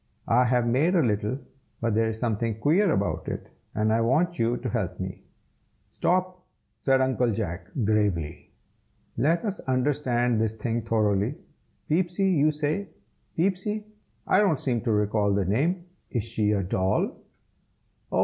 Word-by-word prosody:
I 125 +3 +4
have 125 -1 +2
made 140 +10 +2
a 170 - +4
little, 105 +1 0 0.4
but 115 -1 0
there 110 +1 +2
is 110 - -4
something 110 -1 -1
queer 170 - +3
about 100 0 -1
it, - - -5 0.2
and 110 +1 +2
I 115 - +2
want 160 +9 +1
you 115 +1 +2
to 125 - -4
help 95 -6 -2
me." 95 0 -6 0.7
"Stop!" 185 0 0 0.4
said 135 -1 +3
Uncle 130 -2 +2
Jack, 100 -4 -3 0.2
gravely. 100 -7 0 0.7
"Let 160 - +1
us 205 -1 -2
understand 125 -3 +1
this 110 -1 0
thing 115 +1 -2
thoroughly. 110 +1 +1 0.5
Peepsy, 180 +4 +1
you 155 -3 +4
say? 155 +5 -2 0.5
Peepsy? 195 +4 0 0.4
I 190 - +4
don't 190 -9 +3
seem 120 -4 0
to 115 - +2
recall 105 -1 +2
the 100 -2 +1
name. 160 - 0 0.2
Is 120 -5 -1
she 110 -2 0
a 100 -2 +1
doll?" 95 +1 0 0.9
"Oh! - - +1
120 Hz, 150 wpm, -26 LUFS, 105-155 Hz, 0.9 s, I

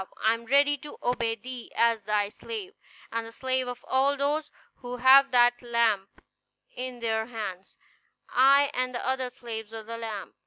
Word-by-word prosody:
I 220 - +3
am 230 0 -7
ready 285 +2 +4
to 295 - -10
obey 235 -2 0
thee 245 +2 -9
as 230 -1 +3
thy 205 0 0
slave, 405 - -7 0.4
and 230 0 -3
the - - -10
slave 260 +1 -1
of 245 0 -7
all 275 +2 +2
those 295 +2 0 0.3
who 245 0 -7
have 270 +2 +7
that 245 -1 +4
lamp 230 -5 0 0.5
in 255 0 -5
their 220 -1 -1
hands; 205 -6 -7 0.5
I 275 +2 +5
and 255 0 -1
the 240 - -3
other 260 -1 0
slaves 230 -3 -7
of 220 -1 -7
the 230 +1 -6
lamp." 210 -6 -6
245 Hz, 170 wpm, -27 LUFS, 225-260 Hz, 0.5 s, have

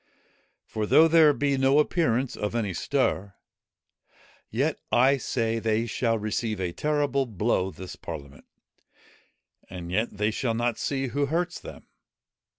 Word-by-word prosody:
For 110 -1 -3
though 160 +8 +6
there 160 -2 +6
be 140 -1 0
no 135 +2 +4
appearance 135 -5 +1
of 105 +2 -3
any 105 -5 -1
stir, 100 +3 -1 1.1
yet - - -1
I 135 +3 +4
say 115 -2 -1
they 110 0 0
shall 115 0 0
receive 110 0 -2
a 90 -2 -2
terrible 145 - 0
blow 105 -3 0
this 95 +1 -9
parliament, 70 -1 -9 1.2
and 90 -1 -7
yet 110 +5 +1
they 105 +1 +1
shall 115 +1 -1
not 120 0 -1
see 135 -2 -1
who 140 +2 0
hurts 175 +4 -1
them. - - -11
115 Hz, 140 wpm, -26 LUFS, 105-140 Hz, 1.2 s, though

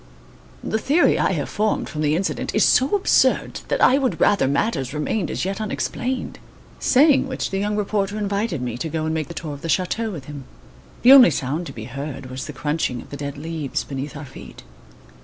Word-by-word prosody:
The 220 - -1
theory 295 +9 +3
I - - +2
have - - -2
formed 215 0 -1
from 150 - -5
the 150 0 +2
incident 185 +3 -2
is - - +4
so 270 +9 +3
absurd 395 - +2
that - - -1
I 270 - +5
would 260 -3 -1
rather 200 -10 +3
matters 140 - -1
remained 165 +5 -1
as - - -2
yet 195 +2 -3
unexplained." 250 +4 -3 0.4
Saying 285 +2 +4
which - - -3
the 195 - -1
young 205 +1 -1
reporter 205 0 -1
invited 200 - -2
me 120 -1 -4
to 160 - -3
go 155 0 -2
and 160 - -1
make 155 -2 -2
the 170 - -9
tour 155 -3 -5
of 140 - -10
the 165 - -5
chateau 210 +6 0
with 155 -10 -7
him. 145 -2 -9 0.6
The 250 - +8
only 265 -6 +9
sound 150 +4 -2
to - - -7
be 110 - -8
heard 135 +1 -7
was 130 +3 -6
the - - -5
crunching 145 -3 -2
of - - -12
the - - -5
dead 140 0 -5
leaves 155 -2 -3
beneath 140 +1 -6
our 145 - -7
feet. 70 - -12
160 Hz, 215 wpm, -22 LUFS, 140-210 Hz, 0.6 s, only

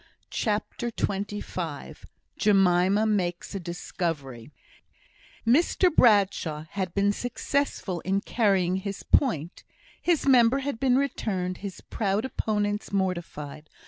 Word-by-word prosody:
CHAPTER 215 +2 -2
XXV 195 -7 -4 0.3
Jemima 195 0 +3
Makes 180 -5 -1
a 195 - -3
Discovery 165 -8 -4 1.0
Mr 330 +7 +3
Bradshaw 195 -9 +3
had 185 -3 -3
been 200 0 +3
successful 245 -6 -2
in 195 +3 0
carrying 195 -6 +1
his 195 +1 -5
point. 175 - +1 0.4
His 345 -3 +1
member 250 -2 +5
had 275 -4 -3
been 260 -2 +3
returned; 195 -9 -1
his 195 -2 -7
proud 205 +1 -1
opponents 210 -4 -2
mortified. 170 -6 -3
200 Hz, 105 wpm, -26 LUFS, 180-225 Hz, 1.0 s, member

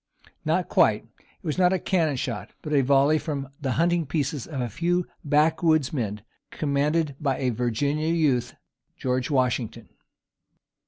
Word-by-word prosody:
Not - - +1
quite. - - +3
It - - -32
was 155 +2 -2
not 180 0 +4
a - - +2
cannon 165 -6 +1
shot, 120 -4 -4
but 150 - -3
a 140 - +5
volley 140 +3 +4
from 140 -3 -4
the 135 -3 -1
hunting 170 0 +1
pieces 140 -2 -2
of 145 -5 -5
a 125 - -1
few 175 - 0 0.2
backwoodsmen, 150 - +1 0.3
commanded 150 +1 0
by 140 -3 0
a 130 -2 0
Virginian 140 +8 0
youth, 130 -7 +1 0.4
George 125 -1 -1
Washington. 125 -5 -1
145 Hz, 145 wpm, -25 LUFS, 130-160 Hz, 0.4 s, a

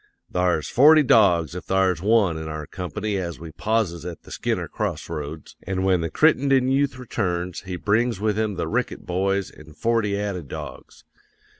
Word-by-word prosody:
"'Thar's 90 -4 +1
forty 150 +4 +6
dogs 90 - +4
if 90 0 -7
thar's 95 -2 +1
one 100 -4 +3
in 80 0 -5
our 75 -1 -5
company 95 +5 -4
as 85 -4 -4
we 85 0 -9
pauses 95 -2 -1
at 85 -2 -7
the - - -14
Skinner - - -2
cross - - -3
roads. 75 +1 -7
An' 95 0 -1
when 95 -2 +2
the 80 - -2
Crittenden 135 - +3
yooth 135 0 +1
returns, 90 -8 -3
he 90 - -3
brings 110 +3 +1
with 105 0 0
him 110 -2 -1
the 85 - -2
Rickett - - -2
boys 95 +1 -1
an' 75 0 -15
forty 105 +1 0
added 100 -7 -4
dogs. - - -9
95 Hz, 175 wpm, -23 LUFS, 85-110 Hz, -, forty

